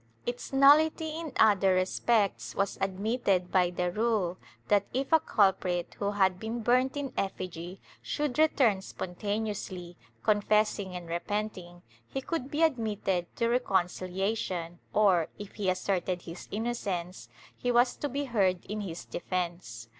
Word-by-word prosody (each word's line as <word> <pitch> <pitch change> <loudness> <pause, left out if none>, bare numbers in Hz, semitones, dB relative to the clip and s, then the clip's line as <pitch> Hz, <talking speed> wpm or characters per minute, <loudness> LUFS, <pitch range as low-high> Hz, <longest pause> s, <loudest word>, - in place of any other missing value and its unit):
Its 245 0 -4
nullity 305 +3 +5
in 325 -3 -5
other 195 -3 +5
respects 200 +3 +1
was 195 0 0
admitted 195 -1 0
by 180 -2 +4
the 180 0 -1
rule 210 -4 0 0.3
that, 200 -1 +3
if 270 +3 -1
a 320 - +8
culprit 190 - +1
who 200 - 0
had 190 -3 +2
been 225 +2 -4
burnt 255 +4 +2
in 275 -3 -3
effigy 185 -1 -4 0.2
should 295 -3 -2
return 255 -10 +4
spontaneously, 190 -2 -4 0.3
con 210 -1 +3
fessing 205 -3 +1
and 175 -1 -9
repenting, 175 0 -4 0.2
he - - -3
could 270 -1 -3
be 300 +3 +1
admitted 210 - 0
to 230 - 0
reconcihation 185 -5 -1
or, 190 -6 +4
if 205 -1 -9
he 200 -3 -1
asserted 185 -1 -1
his 170 +1 -9
innocence, 200 -5 -3 0.3
he 245 - -1
was 245 +1 +4
to 290 - -3
be 285 +2 -2
heard 195 -8 +1
in 210 +2 -4
his 175 -4 -6
defence. 170 -11 -4
200 Hz, 140 wpm, -29 LUFS, 180-235 Hz, 0.3 s, a